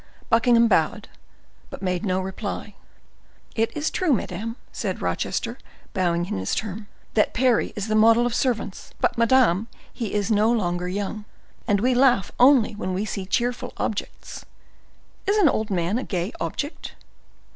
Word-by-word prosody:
Buckingham 235 0 +5
bowed, 205 +2 +1 0.6
but - - -9
made 180 +1 -1
no 185 -3 0
reply. 200 +2 -5 0.8
"It 225 0 +1
is 300 +1 -1
true, 355 -6 +1
madam," 225 0 -3 0.2
said - - -3
Rochester, - - -2 0.3
bowing 175 -3 +1
in 95 - -3
his 95 - -1
turn, 210 0 -4 0.3
"that 210 - +2
Parry 250 -1 +2
is 210 0 -3
the 215 - -1
model 225 +2 +5
of 245 - -1
servants; 235 -6 -2
but, - - +1
madam, 230 -4 +3 0.3
he 225 -4 -4
is 205 +2 0
no 215 +2 +4
longer 180 -6 0
young, 205 +3 -4 0.4
and 205 -1 +3
we 255 +3 +3
laugh 245 -6 +3
only 250 -3 +6
when 185 -3 -3
we 200 +3 -1
see 195 -3 -5
cheerful 245 +3 -1
objects. 210 - -4 0.8
Is 405 +2 +3
an 400 -6 +5
old 220 -5 0
man 185 +3 0
a - - -4
gay 180 +2 -3
object?" 290 +3 -4
215 Hz, 155 wpm, -24 LUFS, 190-240 Hz, 0.8 s, only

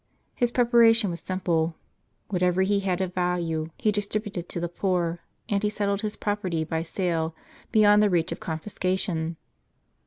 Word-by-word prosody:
His 245 - +1
preparation 235 -4 +4
was 170 - -3
simple: 170 -3 -1 0.5
whatever 180 -1 +2
he 200 +1 +2
had 190 -2 -1
of 185 -1 -2
value 175 -3 -1
he 215 - +2
distributed 205 -3 -3
to - - -3
the 175 - -1
poor, 175 -1 -1 0.3
and 200 -1 0
he 210 - +1
settled 200 -1 -1
his 215 -1 -3
property, 190 -6 -1
by 160 +1 -2
sale, 165 -2 -1 0.4
beyond 210 -2 +6
the 210 - +4
reach 170 -3 +1
of - - -4
confiscation. 170 -1 -2
185 Hz, 155 wpm, -26 LUFS, 170-205 Hz, 0.5 s, beyond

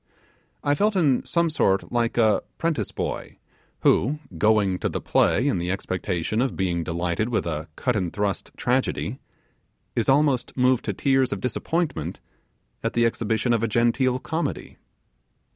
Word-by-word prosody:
I 145 - +2
felt 205 +7 +1
in 145 -9 +3
some 170 -1 +1
sort 95 -10 +1
like 120 -1 0
a 110 -4 +4 0.2
'prentice 160 - -1
boy - - -4 0.4
who, 140 +8 +3 0.2
going 100 0 +2
to - - -1
the - - -3
play 130 - +2
in 135 - +1
the 85 +1 -2
expectation 95 +2 -2
of 130 - 0
being 85 -3 0
delighted 85 +6 -1
with 115 - 0
a 80 -1 -3
cut 125 -2 0
and 90 -5 -1
thrust 100 -1 -2
tragedy, 130 0 -1 0.8
is 115 - +1
almost 135 -3 +2
moved 125 -1 +3
to 105 - -1
tears 135 +4 +2
of 100 - -2
disappointment 125 - -2 0.6
at - - -2
the 120 0 +3
exhibition 115 +1 0
of 115 - +1
a 115 - +1
genteel 120 +3 +2
comedy. 160 +5 -4
115 Hz, 155 wpm, -24 LUFS, 95-135 Hz, 0.8 s, a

